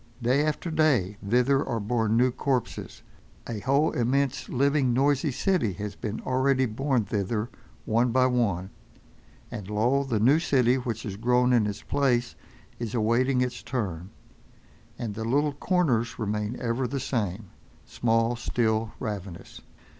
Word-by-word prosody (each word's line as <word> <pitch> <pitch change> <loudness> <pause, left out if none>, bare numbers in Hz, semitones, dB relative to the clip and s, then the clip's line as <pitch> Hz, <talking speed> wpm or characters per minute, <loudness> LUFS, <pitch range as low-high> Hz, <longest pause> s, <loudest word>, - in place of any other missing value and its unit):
Day 130 +4 +2
after 155 +2 -2
day 130 - +2
thither 125 +6 +2
are 115 - -2
borne 110 +1 0
new 125 +1 +4
corpses, 130 -1 -3 0.4
a 115 -3 -4
whole, 140 +7 +2
immense, 135 +2 0
living, 140 -1 +2
noisy 140 +3 +2
city 140 - 0
has 100 +3 -6
been 110 0 -4
already 130 +1 +2
borne 125 0 0
thither 105 +3 -2 0.3
one 115 +2 +2
by 130 +1 +4
one, 100 -8 0 0.8
and 100 -2 -7
lo! 120 +7 +2
the 120 -6 -1
new 135 +9 +5
city 130 -6 +2
which 115 -4 -4
has 100 -2 -5
grown 125 +2 +2
in 115 -4 +3
its 105 0 -5
place 125 -4 +1 0.5
is 115 -1 -4
awaiting 125 +4 +2
its 125 -1 -2
turn—and 110 +2 -7
the 110 +2 -5
little 145 +5 +1
corners 140 -8 0
remain 105 +1 -2
ever 125 +1 -1
the 135 +3 -3
same, 105 -6 -3 0.3
small, 115 0 +1
still, 110 -2 -1
ravenous. 100 -6 -6
120 Hz, 140 wpm, -26 LUFS, 110-135 Hz, 0.8 s, new